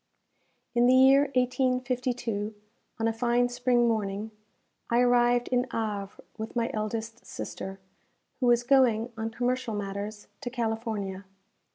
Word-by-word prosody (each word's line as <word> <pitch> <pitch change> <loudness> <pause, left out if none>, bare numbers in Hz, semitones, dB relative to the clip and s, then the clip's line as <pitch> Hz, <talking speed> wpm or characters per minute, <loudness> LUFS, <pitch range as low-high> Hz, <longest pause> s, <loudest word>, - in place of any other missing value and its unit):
In 240 0 +4
the 255 - +6
year 270 +2 +7
1852, 250 -4 0 0.4
on 225 - +1
a 225 - +1
fine 240 +1 +2
spring 245 -1 +2
morning, 215 -1 -1 0.6
I 235 - +3
arrived 245 0 +3
in 250 0 +1
Havre 205 -3 -4 0.2
with 220 +2 -5
my 235 -1 0
eldest 220 +1 -4
sister, 195 0 -7 0.6
who 255 - +1
was 240 0 +4
going, 240 -3 +3
on 225 0 -3
commercial 245 0 -1
matters, 205 +1 -5 0.2
to 250 - -3
California. 220 -5 -3
235 Hz, 130 wpm, -28 LUFS, 220-245 Hz, 0.6 s, year